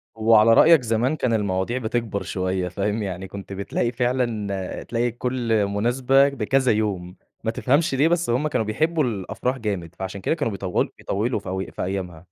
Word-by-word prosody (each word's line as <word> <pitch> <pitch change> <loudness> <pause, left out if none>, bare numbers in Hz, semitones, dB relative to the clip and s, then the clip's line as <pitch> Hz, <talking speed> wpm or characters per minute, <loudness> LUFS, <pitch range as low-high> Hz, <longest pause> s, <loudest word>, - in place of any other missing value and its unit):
وعلى 110 0 +5
رأيك 160 +3 +7
زمان 120 +5 0
كان 125 -5 0
المواضيع 100 +2 0
بتكبر 115 -3 -2
شوية، 95 -1 -2
فاهم، 105 +4 -2
يعني 95 0 -5
كنت 100 0 -8
بتلاقي 100 +4 -2
فعلًا 115 -6 -2
تلاقي 120 0 -1
كُلّ 120 -3 0
مناسبة 125 +7 +3
بكذا 130 0 +1
يوم، 100 -4 -1 0.3
ما 110 - 0
تفهمش 140 +5 +1
ليه، 145 +4 +4
بس 175 -4 +1
هُم 130 +6 +1
كانوا 115 -7 0
بيحبوا 155 +8 +1
الأفراح 120 +3 -2
جامد، 95 -7 -4
فعشان 95 +1 -6
كده 160 - 0
كانوا 140 -9 -1
بيطو 95 -2 0
بيطولوا 110 +4 -1
في 100 - -8
أوي 95 +1 -4
في - - -4
أيامها. 90 -3 -4
110 Hz, 170 wpm, -23 LUFS, 100-125 Hz, 0.3 s, رأيك